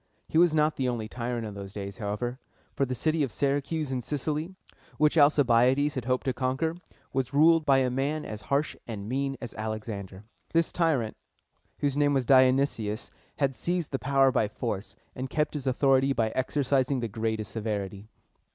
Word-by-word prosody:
He 160 Hz, -, +2 dB
was 170 Hz, -2 st, +5 dB
not 155 Hz, 0 st, +2 dB
the 130 Hz, -2 st, 0 dB
only 115 Hz, -3 st, -3 dB
tyrant 120 Hz, 0 st, -3 dB
in 105 Hz, -, -6 dB
those 100 Hz, -1 st, -8 dB
days, 100 Hz, -1 st, -6 dB
however; 115 Hz, +5 st, -3 dB, 0.3 s
for 140 Hz, -2 st, 0 dB
the 130 Hz, -, -2 dB
city 155 Hz, +5 st, 0 dB
of 135 Hz, -5 st, 0 dB
Syracuse 145 Hz, +2 st, -1 dB
in 130 Hz, -1 st, -1 dB
Sicily, 150 Hz, +6 st, -3 dB, 0.4 s
which 150 Hz, +1 st, +3 dB
Alcibiades 145 Hz, -1 st, +4 dB
had 130 Hz, -3 st, -4 dB
hoped 130 Hz, 0 st, 0 dB
to 130 Hz, -, +1 dB
conquer, 130 Hz, +6 st, -1 dB, 0.4 s
was 135 Hz, +1 st, -1 dB
ruled 160 Hz, +1 st, +5 dB
by 135 Hz, -1 st, +6 dB
a 130 Hz, -1 st, +2 dB
man 140 Hz, +4 st, -1 dB
as 105 Hz, 0 st, -6 dB
harsh 140 Hz, +2 st, +1 dB
and 105 Hz, -3 st, -6 dB
mean 135 Hz, +2 st, -1 dB
as 120 Hz, -, -7 dB
Alexander. 110 Hz, -3 st, -5 dB, 0.3 s
This 165 Hz, 0 st, +2 dB
tyrant, 145 Hz, -10 st, 0 dB, 0.6 s
whose 140 Hz, -2 st, +1 dB
name 145 Hz, -1 st, +3 dB
was 130 Hz, -2 st, +1 dB
Di 130 Hz, 0 st, +7 dB
o -, -, +4 dB
nys´ius, 115 Hz, -5 st, -1 dB, 0.2 s
had 140 Hz, -2 st, +1 dB
seized 175 Hz, +3 st, -2 dB
the 135 Hz, -, -1 dB
power 135 Hz, 0 st, +3 dB
by 110 Hz, -, +2 dB
force, 105 Hz, -2 st, -4 dB, 0.2 s
and 130 Hz, +1 st, -4 dB
kept 150 Hz, +2 st, 0 dB
his 140 Hz, -3 st, -4 dB
authority 135 Hz, +1 st, +3 dB
by 115 Hz, -3 st, +1 dB
exercising 130 Hz, +1 st, 0 dB
the 115 Hz, -, -1 dB
greatest 110 Hz, 0 st, -3 dB
severity. 105 Hz, -2 st, -4 dB
130 Hz, 185 wpm, -28 LUFS, 115-145 Hz, 0.6 s, Di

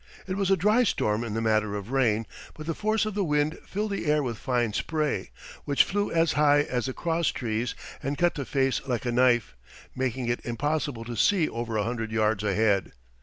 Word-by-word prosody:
It 185 Hz, -, -3 dB
was 195 Hz, -1 st, 0 dB
a 195 Hz, -, +4 dB
dry 210 Hz, +7 st, +4 dB
storm 105 Hz, -, 0 dB
in 110 Hz, -2 st, -4 dB
the 115 Hz, -, -1 dB
matter 110 Hz, -2 st, +1 dB
of 105 Hz, +3 st, -6 dB
rain, 115 Hz, -5 st, +2 dB, 0.3 s
but 155 Hz, -, -8 dB
the 165 Hz, -, -1 dB
force 215 Hz, +4 st, 0 dB
of 215 Hz, -, -3 dB
the 200 Hz, 0 st, 0 dB
wind 150 Hz, -1 st, 0 dB
filled 210 Hz, +2 st, -2 dB
the 195 Hz, -5 st, -3 dB
air 150 Hz, 0 st, +3 dB
with 120 Hz, -4 st, -4 dB
fine 120 Hz, -5 st, 0 dB
spray, 155 Hz, +5 st, -1 dB, 0.4 s
which 140 Hz, -1 st, +4 dB
flew 205 Hz, +1 st, -1 dB
as 165 Hz, -1 st, +3 dB
high 145 Hz, -1 st, +4 dB
as 125 Hz, -4 st, -2 dB
the 130 Hz, -, -3 dB
crosstrees 125 Hz, -9 st, -1 dB, 0.3 s
and 140 Hz, +2 st, -2 dB
cut 175 Hz, 0 st, +3 dB
the 140 Hz, -, -4 dB
face 135 Hz, 0 st, 0 dB
like 125 Hz, -2 st, -2 dB
a 120 Hz, -, 0 dB
knife, 120 Hz, -, +3 dB, 0.4 s
making 130 Hz, -1 st, -2 dB
it 120 Hz, +1 st, -1 dB
impossible 135 Hz, 0 st, -2 dB
to 120 Hz, 0 st, -5 dB
see 170 Hz, -, +3 dB
over 115 Hz, -1 st, -3 dB
a 105 Hz, -, +1 dB
hundred 115 Hz, 0 st, -3 dB
yards 110 Hz, -2 st, +1 dB
ahead. 105 Hz, -1 st, +1 dB
130 Hz, 210 wpm, -27 LUFS, 115-160 Hz, 0.4 s, a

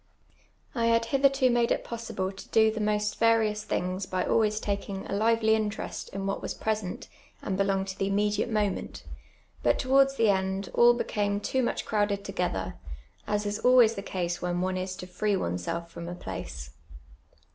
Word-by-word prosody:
I 230 Hz, -2 st, +1 dB
had 230 Hz, 0 st, +3 dB
bithei 275 Hz, +3 st, +3 dB
to 265 Hz, -2 st, +3 dB
made 240 Hz, -1 st, +2 dB
it -, -, +1 dB
possible 225 Hz, -5 st, -4 dB
to 195 Hz, -, -12 dB
do 220 Hz, -1 st, +4 dB
the 220 Hz, -, -5 dB
most 210 Hz, 0 st, 0 dB
various 220 Hz, -2 st, +3 dB
thin«::s 185 Hz, -1 st, -2 dB
by 185 Hz, -1 st, -1 dB
always 215 Hz, -1 st, +2 dB
taking 200 Hz, -1 st, -3 dB
a -, -, -5 dB
lively 220 Hz, +1 st, +3 dB
interest 215 Hz, -1 st, -2 dB
in 195 Hz, 0 st, -5 dB
what 195 Hz, -, -2 dB
was -, -, -4 dB
present 215 Hz, -4 st, -3 dB, 0.4 s
and 190 Hz, -, -2 dB
be 195 Hz, -, +2 dB
longed 195 Hz, 0 st, 0 dB
to 190 Hz, -, -7 dB
the 195 Hz, -, +1 dB
immediate 205 Hz, +2 st, +1 dB
moment; 210 Hz, -3 st, -2 dB, 0.6 s
but -, -, +3 dB
towards 270 Hz, +1 st, +3 dB
tlie 215 Hz, -4 st, +4 dB
end 190 Hz, 0 st, -3 dB
all 240 Hz, 0 st, +6 dB
Ix'camc 205 Hz, -3 st, -1 dB
too 260 Hz, -, 0 dB
much 240 Hz, -, -1 dB
crowdi'd 205 Hz, -2 st, 0 dB
toj^ether, 180 Hz, -, -2 dB, 0.5 s
as 210 Hz, 0 st, 0 dB
is 205 Hz, +1 st, -2 dB
always 245 Hz, -3 st, +6 dB
tlie 195 Hz, -2 st, -7 dB
case 175 Hz, -2 st, -2 dB
when 175 Hz, 0 st, -1 dB
one 185 Hz, 0 st, -1 dB
is 185 Hz, 0 st, -3 dB
to 180 Hz, -, -8 dB
free 200 Hz, +3 st, -1 dB
oneself 165 Hz, -, -3 dB
from 170 Hz, 0 st, -7 dB
a 175 Hz, -, -5 dB
place. -, -, -7 dB
205 Hz, 185 wpm, -28 LUFS, 190-225 Hz, 0.6 s, all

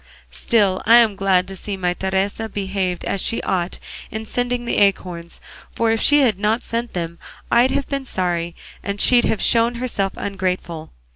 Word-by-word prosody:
Still 200 Hz, -5 st, +1 dB
I'm 230 Hz, -2 st, +6 dB
glad 190 Hz, -2 st, +2 dB
to 195 Hz, -, -8 dB
see 195 Hz, +1 st, -5 dB
my 180 Hz, -1 st, 0 dB
Teresa 190 Hz, +4 st, -2 dB
behaved 190 Hz, -3 st, -3 dB
as 195 Hz, -, -1 dB
she 230 Hz, -, 0 dB
ought 180 Hz, -1 st, -1 dB, 0.3 s
in 220 Hz, 0 st, -5 dB
sending 245 Hz, +1 st, -2 dB
the -, -, 0 dB
acorns, 180 Hz, -4 st, 0 dB, 0.4 s
for 230 Hz, -1 st, +2 dB
if 225 Hz, -, 0 dB
she 290 Hz, 0 st, +5 dB
had 220 Hz, -8 st, +2 dB
not 215 Hz, +3 st, +1 dB
sent 235 Hz, +1 st, -3 dB
them 170 Hz, -1 st, -4 dB, 0.3 s
I'd 240 Hz, +2 st, +5 dB
have 275 Hz, +1 st, -1 dB
been 275 Hz, -1 st, -3 dB
sorry, 175 Hz, -5 st, -2 dB, 0.3 s
and 200 Hz, 0 st, -4 dB
she'd 245 Hz, +2 st, +5 dB
have 215 Hz, -, 0 dB
shown 235 Hz, +1 st, +3 dB
herself 230 Hz, -6 st, -2 dB
ungrateful. 185 Hz, -5 st, -3 dB
200 Hz, 170 wpm, -20 LUFS, 185-230 Hz, 0.4 s, I'm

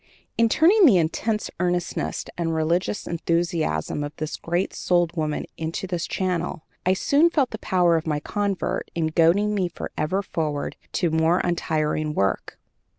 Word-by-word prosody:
In 230 Hz, 0 st, +3 dB
turning 360 Hz, -, +6 dB
the 210 Hz, -9 st, +6 dB
intense 210 Hz, +6 st, -1 dB
earnestness 175 Hz, -1 st, -1 dB
and 165 Hz, -2 st, -1 dB
religious 170 Hz, +6 st, 0 dB
enthusiasm 170 Hz, -, -1 dB
of 145 Hz, +1 st, -6 dB
this 155 Hz, 0 st, -4 dB
great 175 Hz, +3 st, -2 dB
souled 175 Hz, -1 st, +1 dB
woman 155 Hz, -2 st, -2 dB
into 165 Hz, +3 st, -3 dB
this 175 Hz, -2 st, -3 dB
channel, 180 Hz, -3 st, -2 dB, 0.2 s
I 185 Hz, -, +5 dB
soon 285 Hz, -, +3 dB
felt 285 Hz, -7 st, +1 dB
the 220 Hz, -, -6 dB
power 175 Hz, -3 st, +3 dB
of 160 Hz, -, -4 dB
my 150 Hz, -1 st, 0 dB
convert 200 Hz, +4 st, -2 dB
in 160 Hz, -2 st, 0 dB
goading 185 Hz, +6 st, +3 dB
me 190 Hz, -3 st, +1 dB
forever 175 Hz, +2 st, -3 dB
forward 155 Hz, -5 st, -3 dB, 0.2 s
to 170 Hz, -3 st, +1 dB
more 160 Hz, +2 st, +3 dB
untiring 155 Hz, -3 st, -1 dB
work. 95 Hz, 0 st, -1 dB
170 Hz, 155 wpm, -24 LUFS, 160-190 Hz, 0.2 s, turning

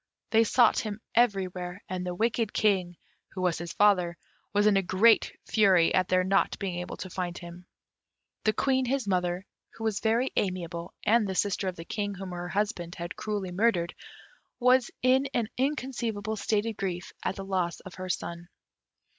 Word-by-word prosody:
They 225 Hz, 0 st, +6 dB
sought 235 Hz, +1 st, +4 dB
him 215 Hz, -1 st, -4 dB
everywhere, 190 Hz, -5 st, 0 dB
and 185 Hz, 0 st, -3 dB
the 180 Hz, -1 st, -3 dB
wicked 225 Hz, +1 st, 0 dB
King, 185 Hz, -5 st, +1 dB, 0.4 s
who 185 Hz, -, -5 dB
was 175 Hz, -3 st, +1 dB
his 170 Hz, 0 st, -5 dB
father, 180 Hz, -4 st, +3 dB, 0.3 s
was 205 Hz, 0 st, +2 dB
in 210 Hz, -1 st, +5 dB
a 195 Hz, -, +4 dB
great 195 Hz, +5 st, +4 dB
fury 190 Hz, -6 st, +4 dB
at 185 Hz, -1 st, +3 dB
their 185 Hz, 0 st, +3 dB
not 195 Hz, +1 st, +2 dB
being 185 Hz, -3 st, -3 dB
able 180 Hz, -, -6 dB
to 185 Hz, -, -6 dB
find 180 Hz, -1 st, -3 dB
him. 175 Hz, 0 st, -10 dB, 0.8 s
The 215 Hz, -, +3 dB
Queen, 260 Hz, +1 st, +1 dB
his 260 Hz, -2 st, -1 dB
mother, 180 Hz, 0 st, 0 dB, 0.3 s
who 225 Hz, -, -8 dB
was 220 Hz, -2 st, 0 dB
very 230 Hz, +4 st, +1 dB
amiable, 175 Hz, -3 st, -2 dB
and 210 Hz, -4 st, +3 dB
sister 200 Hz, -1 st, 0 dB
of 185 Hz, -, -2 dB
the 165 Hz, -, -9 dB
King 205 Hz, +1 st, -3 dB
whom 190 Hz, -1 st, -7 dB
her 175 Hz, 0 st, -5 dB
husband 185 Hz, -4 st, -2 dB
had 170 Hz, +1 st, -6 dB
cruelly 205 Hz, -4 st, -3 dB
murdered, 180 Hz, -3 st, +1 dB, 0.7 s
was 250 Hz, 0 st, +4 dB
in 260 Hz, +2 st, +4 dB
an 230 Hz, -3 st, 0 dB
inconceivable 245 Hz, -6 st, -2 dB
state 210 Hz, 0 st, 0 dB
of 225 Hz, -2 st, -4 dB
grief 185 Hz, -2 st, -4 dB
at 190 Hz, -, -1 dB
the 195 Hz, -, -6 dB
loss 185 Hz, -3 st, -1 dB
of 185 Hz, -, -11 dB
her 185 Hz, 0 st, -7 dB
son. 170 Hz, -1 st, -4 dB
195 Hz, 180 wpm, -28 LUFS, 180-220 Hz, 0.8 s, They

